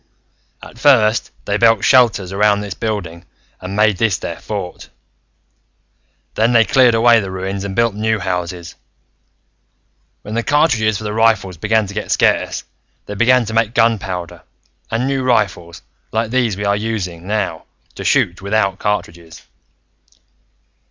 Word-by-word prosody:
"At 120 - -12
first, 120 -6 +3 0.2
they 100 - 0
built 115 -2 +3
shelters 115 -8 +3
around 105 +1 +2
this 100 -2 -5
building 90 -6 -4 0.4
and 95 +2 -6
made 105 -2 +2
this 105 -2 +1
their 85 - -6
fort. 100 -4 -6 1.4
Then 115 +3 +1
they 115 -1 +5
cleared 125 -2 +4
away 115 0 +5
the 100 -3 -5
ruins, 95 +1 -4
and 100 -1 -5
built 115 -1 +2
new 110 +2 0
houses. 90 -3 -4 1.5
When 105 - -7
the 115 - 0
cartridges 115 -7 +1
for 110 - -8
the 105 0 -4
rifles 110 -5 +1
began 110 +5 +1
to 100 - -9
get 105 - -5
scarce, - - +1 0.4
they - - -7
began 120 +3 +3
to 110 - -6
make 115 0 0
gunpowder, 95 -7 -1 0.5
and 115 +3 -1
new 135 0 -1
rifles, 105 -9 -1 0.3
like 110 0 -2
these 120 -6 0
we 100 - -4
are 100 0 +2
using 95 -5 -4
now, 105 -6 -2 0.3
to - - -8
shoot 90 +1 +1
without 100 -1 0
cartridges. 85 -5 -4
105 Hz, 145 wpm, -17 LUFS, 95-115 Hz, 1.5 s, they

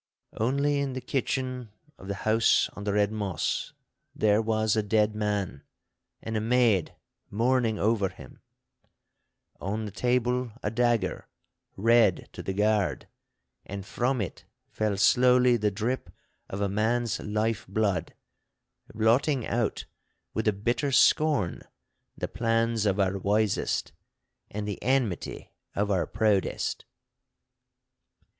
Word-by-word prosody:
Only 140 +5 +1
in 140 -2 -2
the 130 - -3
kitchen 130 -2 -2 0.3
of 95 - -11
the 100 - -3
house 110 +1 +3
on 105 - -8
the 100 - 0
Red 105 0 +2
Moss 100 -6 -2 0.4
there 105 0 +3
was 110 -1 +1
a 110 - +2
dead 105 0 +2
man, 105 -8 -2 0.6
and 110 - -4
a 110 - 0
maid 115 -5 +2 0.3
mourning 115 0 +1
over 105 -2 +1
him; - - -14 1.2
on 105 +3 -3
the 105 - -6
table 125 +1 0
a 105 - -1
dagger, 120 -4 0 0.5
red 115 -2 +3
to - - -7
the - - -3
guard, 105 -1 +1 0.6
and 100 0 -7
from 125 +3 0
it 95 - -5 0.3
fell 105 -2 -1
slowly 125 +3 +5
the 105 -2 +1
drip 115 +6 -3 0.4
of 95 - -4
a 100 - +2
man's 110 +4 0
life 105 0 -1
blood, 100 -1 -1 0.8
blotting 120 +4 +2
out 115 -3 -1 0.5
with 110 0 -1
a - - +6
bitter 120 +7 -1
scorn 140 - +3 0.6
the - - -3
plans 115 -1 0
of 100 0 +1
our 95 0 +1
wisest 105 +1 0 0.6
and 105 0 -4
the 105 - -5
enmity 125 -7 -1 0.2
of 100 +1 0
our 95 -3 +1
proudest. 105 -3 0
110 Hz, 125 wpm, -27 LUFS, 100-120 Hz, 1.2 s, a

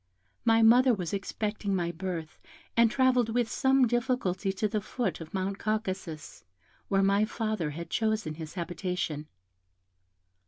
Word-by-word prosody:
My 225 0 +5
mother 245 +2 +6
was 180 -3 -4
expecting 205 0 -2
my 170 -2 0
birth, 175 -2 -5 0.4
and 230 0 +5
travelled 255 -1 +3
with 240 0 +1
some 265 +3 +3
difficulty 240 -6 0
to 195 +3 -1
the 215 0 -1
foot 230 -1 -3
of 160 - -9
Mount 195 +1 -2
Caucasus, 190 - -3 0.4
where 195 -1 +2
my 200 +2 +3
father 215 -7 -2
had 170 +3 -7
chosen 220 -7 0
his 155 +1 -8
habitation. 175 -3 -3
200 Hz, 140 wpm, -29 LUFS, 175-225 Hz, 0.4 s, mother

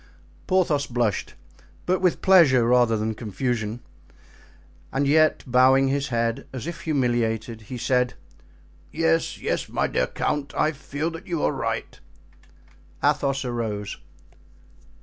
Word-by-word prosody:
Porthos 165 -6 +2
blushed, 120 -5 -1 0.5
but 185 +1 +1
with 180 -2 +1
pleasure 155 -11 +6
rather 120 -2 +3
than 110 +1 -1
with 110 - -5
confusion; 115 +1 -3 1.1
and 140 +1 0
yet, 155 +2 +3
bowing 130 +1 +4
his 140 +1 0
head, 115 -2 -1
as 130 -1 -6
if 170 -1 -6
humiliated, 120 -6 -1
he 125 - -5
said: 125 +1 +1 0.8
"Yes, 80 0 +1
yes, - - -2
my - - 0
dear - - 0
count, 145 -1 -3
I 155 - +2
feel 150 +2 -4
that 165 +4 -10
you 170 -3 -2
are - - +2
right." - - -4 1.0
Athos 140 -2 +1
arose. 110 -4 -3
130 Hz, 130 wpm, -24 LUFS, 115-145 Hz, 1.1 s, pleasure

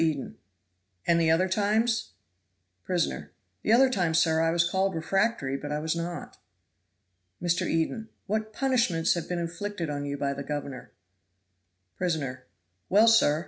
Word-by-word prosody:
Eden. 155 -5 -1 0.7
"And 170 0 +3
the 160 - +3
other 165 +4 +3
times?" 220 +4 +1 0.7
Prisoner. 180 -2 -2 0.3
"The - - 0
other 260 +4 +7
times, 175 -8 +1
sir, 160 -1 +3
I 165 - +3
was 170 +1 +2
called 190 +1 0
refractory 165 -4 0
but 145 +1 -6
I 150 - 0
was 155 +2 -1
not." 170 +1 -5 1.0
Mr. 175 +1 0
Eden. 190 +8 -1 0.2
"What 215 +2 -2
punishments 230 -10 +1
have 170 -2 -4
been 180 - -1
inflicted 170 0 -4
on 145 0 -3
you 140 0 -3
by 140 0 -1
the 140 - -6
governor?" 140 -2 -5 1.1
Prisoner. 135 -8 -2 0.4
"Well, 210 +4 +5
sir! 190 -10 +5
170 Hz, 145 wpm, -27 LUFS, 155-205 Hz, 1.1 s, other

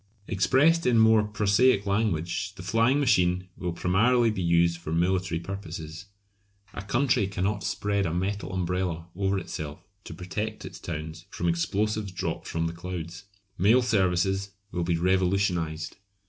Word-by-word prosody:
Expressed 145 - +3
in 120 -2 +4
more 110 -1 +6
prosaic 105 +1 +2
language, 100 -1 -1
the 95 - -9
flying 115 +7 +2
machine 90 -8 +2
will 90 -2 -3
primarily 110 +8 +3
be 95 - -3
used 85 0 +2
for 80 -2 -6
military 90 +1 +1
purposes. 85 -2 -7 0.7
A - - -5
country 120 0 +1
cannot 100 +2 -2
spread 100 -2 -1
a - - -2
metal 95 +4 -2
umbrella 90 -2 -2
over 100 +1 0
itself 75 -3 -6 0.2
to 80 - -8
protect 105 +5 -5
its - - -9
towns 80 +1 -6
from 85 - -3
explosives 100 +4 0
dropped 90 - -4
from 80 0 -2
the 80 - -2
clouds. 90 +1 -7 0.3
Mail 110 +7 +5
services 95 -2 +1 0.2
will 90 -1 -2
be 85 0 0
revolutionised. 90 -3 0
95 Hz, 145 wpm, -27 LUFS, 85-105 Hz, 0.7 s, more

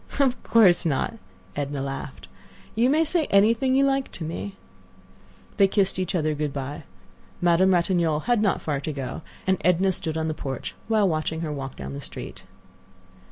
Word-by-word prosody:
"Of 260 -3 +2
course 200 -7 +5
not," 165 +8 -1 0.4
Edna 140 -1 -3
laughed. 135 -1 -6 0.5
"You 235 +3 +3
may 310 +3 +4
say 320 0 +1
anything 230 +6 +3
you 275 +1 +4
like 270 -1 0
to 170 - -5
me." 170 +5 -5 1.0
They 200 -2 +6
kissed 195 -1 +1
each 185 +1 -1
other 155 -2 +1
good 150 -1 -2
by. 140 +2 -5 0.5
Madame 175 +2 +4
Ratignolle 170 -3 +1
had 240 +1 +1
not 200 -4 +1
far 145 -3 -1
to 155 +2 -4
go, 135 +1 -5 0.2
and 190 -1 +2
Edna 180 +3 +3
stood 160 -3 -2
on 160 0 -1
the 155 - -1
porch 135 -4 -5
a - - -14
while 215 -3 +4
watching 160 -1 -1
her 160 -2 -3
walk 135 -2 -5
down 70 0 -7
the 70 - -6
street. - - -7
170 Hz, 180 wpm, -25 LUFS, 150-210 Hz, 1.0 s, They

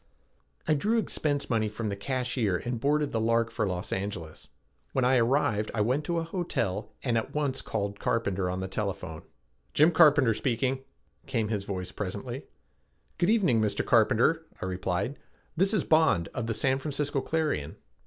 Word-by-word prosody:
I 155 - +4
drew 210 +11 +1
expense 150 -9 0
money 110 -3 +1
from 105 +1 -4
the 100 - -2
cashier 125 -3 -1
and 120 +2 -3
boarded 145 +3 +1
the 115 - 0
Lark 115 0 +2
for 110 - -1
Los 90 -1 -3
Angeles. 95 -5 -5 0.4
When 130 - +2
I 130 +1 +4
arrived 115 -3 +2
I 105 - +1
went 130 +8 +1
to 170 +1 -1
a 165 - 0
hotel 115 - -2
and 120 -3 +2
at 115 - -7
once 140 -3 0
called 100 -2 -3
Carpenter 100 -5 0
on 90 +1 -3
the 95 - -3
telephone. 95 -5 -4 0.5
"Jim 155 +4 +6
Carpenter 145 -7 +6
speaking," 130 +3 -1 0.4
came 115 -6 0
his 105 -3 -2
voice 95 -3 -4
presently. - - -5 0.7
"Good 175 +2 +3
evening, 185 - +3
Mr. 105 -2 0
Carpenter," 120 +7 +3 0.2
I - - -4
replied, 95 +7 -2 0.4
"this 190 +4 +3
is 215 -7 +2
Bond 155 - +3
of 120 -3 -3
the 115 - -1
San 130 +3 +1
Francisco 145 -1 -1
Clarion." 155 - -1
115 Hz, 170 wpm, -28 LUFS, 105-145 Hz, 0.7 s, Jim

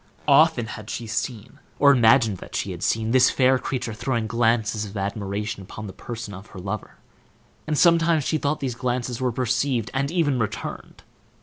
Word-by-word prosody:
Often 145 -3 +5
had 105 0 -9
she 120 - -4
seen, 110 +1 -4 0.2
or 140 -1 +6
imagined 115 -5 +4
that - - -10
she - - -2
had - - -7
seen, 110 0 0
this 130 0 +5
fair 130 0 +3
creature 125 -4 -3
throwing 115 +1 -2
glances 115 -1 +1
of 105 0 -7
admiration 100 +2 -3
upon 105 +3 -8
the 95 - -8
person 115 -2 -7
of 95 +3 -10
her 95 - -11
lover, 95 +3 -5 0.7
and 155 -1 0
sometimes 165 -2 +4
she 155 +3 0
thought 145 +2 -1
these 130 -3 -2
glances 125 0 -3
were 125 -1 +1
perceived, 125 0 0
and 140 +1 0
even 150 -6 +1
returned. 115 +1 -5
120 Hz, 180 wpm, -24 LUFS, 110-135 Hz, 0.7 s, or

